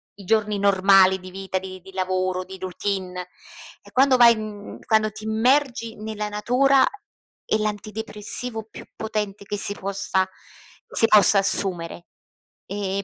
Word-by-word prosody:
i 200 - -13
giorni 210 0 +1
normali 195 -1 +4
di 185 0 -11
vita, 190 0 -4
di 185 -1 -7
di 190 - -14
lavoro, 185 0 -1
di 190 +1 -10
routine. 185 -1 -4 0.5
E - - -18
quando 260 0 +4
vai 235 -1 +7
in 215 -2 -8
quando 215 -1 +2
ti 215 +1 -10
immergi 235 +1 +1
nella 215 0 -5
natura 255 +6 +3 0.6
è - - +1
l'antidepressivo 215 +2 -4
più - - -11
potente 210 -2 -4
che 205 - -4
si 200 - 0
possa 195 -1 -2 0.6
si 225 - +5
possa 205 -2 +7
assumere. 180 -3 0 0.6
E 200 0 -3
205 Hz, 140 wpm, -23 LUFS, 190-220 Hz, 0.6 s, vai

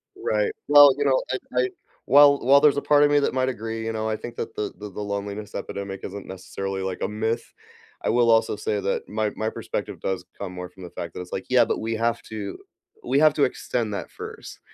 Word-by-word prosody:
Right. 105 -1 0 0.2
Well, 145 -1 +9
you 145 - 0
know, 130 -1 +3 0.3
I 125 - +4
I 125 - 0 0.4
while 140 +1 +7
while 140 +3 +6
there's 150 -1 +5
a - - +1
part 145 0 +4
of 145 - +4
me 145 - +5
that 140 - 0
might 130 0 +1
agree, 115 -1 -4
you 115 - -2
know, 110 0 -2
I 110 - -1
think 120 0 -8
that - - -5
the 105 - -3
the 105 0 -7
the 105 - -6
loneliness 100 +1 -5
epidemic 100 -1 -5
isn't 100 0 -7
necessarily, 95 +1 -5
like, 95 -1 -4
a - - 0
myth. 110 +2 -1 0.6
I - - 0
will 120 0 +4
also 115 -1 +3
say 105 0 -2
that 100 0 -2
my 110 0 -1
my 110 0 -1
perspective - - -5
does 90 -2 -3
come 90 - -6
more 90 -1 -6
from 95 +1 -14
the 90 - -8
fact 85 -1 -7
that - - -6
it's, 90 - -10
like, 95 - -4
"Yeah, 125 -2 +5
but - - -1
we 115 +1 -2
have 115 +1 0
to 105 -3 -6 0.5
we 135 +3 +2
have 155 -1 +6
to 145 - +2
extend 115 -3 -1
that 100 - -5
first. - - -9
110 Hz, 240 wpm, -24 LUFS, 100-125 Hz, 0.6 s, Well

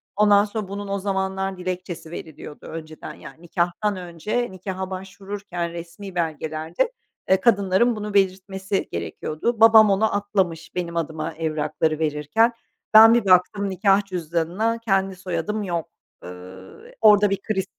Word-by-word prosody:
Ondan 205 0 +5
sonra 210 -1 -5
bunun 200 +1 -6
o 200 0 -2
zamanlar 190 -1 -2
dilekçesi 180 -3 -5
veriliyordu 155 -3 -9
önceden. 155 -1 -8
Yani 160 - -13
nikâhtan 175 +4 -1
önce, 185 +7 -3
nikaha 190 0 -5
başvururken 190 -2 -6
resmî 170 +3 -9
belgelerde, 160 - -2 0.4
eee, 190 - +5
kadınların 200 +1 +3
bunu 210 -1 -5
belirtmesi 190 0 0
gerekiyordu. 220 +10 -3
Babam 220 -1 +8
onu 205 +1 +1
atlamış 190 -5 -2
benim 170 -2 -3
adıma 160 0 -3
evrakları 155 0 -1
verirken. 155 +10 +1 0.4
Ben 225 +1 +10
bir 235 -3 +2
baktım 190 +2 +3
nikâh 195 +1 +2
cüzdanına 180 +5 -1
kendi 195 -4 0
soyadım 190 +3 -3
yok. 170 -4 -3 0.3
Eee, 90 - -8 0.7
orada 210 -2 +6
bir 195 0 -2
kriz 195 -3 -2
190 Hz, 130 wpm, -23 LUFS, 170-205 Hz, 0.7 s, Ben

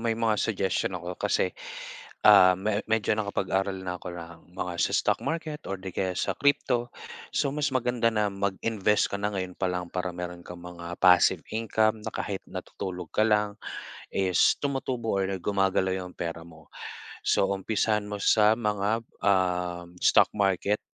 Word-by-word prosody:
may 115 -1 0
mga 110 -2 +1
suggestion 95 -3 0
ako 90 +1 -5
kasi, - - +1 0.7
ah, 90 0 +8
me 100 +2 -1
medyo 110 -1 +1
nakapag-aral 95 -1 -1
na 90 -1 -4
ako 90 -1 -7
ng 85 +1 -11
mga 90 -1 -3
sa - - +1
stock - - +2
market 160 -2 -2
or 95 - -2
'di 95 0 -7
kaya 95 0 -2
sa - - -2
crypto. 135 -4 +2 0.5
So 140 - +1
mas 145 -1 -1
maganda 120 -2 +1
na 105 -1 +1
mag-invest 100 +1 0
ka 100 - -2
na 105 0 -2
ngayon 95 -1 -4
pa 95 - 0
lang 90 -1 -3
para 90 -1 -3
meron 90 -1 -6
kang 90 -1 -9
mga 85 0 -7
passive 90 -1 +6
income 110 0 +1
na - - -5
kahit 100 -2 -4
natutulog 90 -2 -6
ka 110 - +2
lang 105 -1 +1 0.5
is 95 -2 +3
tumutubo 130 -6 -1
or 95 0 0
gumagalaw 95 -1 +1
yung 90 - -10
pera 85 -1 -5
mo. 80 -3 -16 0.5
So 95 - +3
umpisahan 105 +2 0
mo 105 0 -5
sa 110 +2 +4
mga, 105 0 0 0.2
ah, 90 -3 +1 0.2
stock - - +6
market. 100 +1 +1
100 Hz, 165 wpm, -27 LUFS, 90-110 Hz, 0.7 s, ah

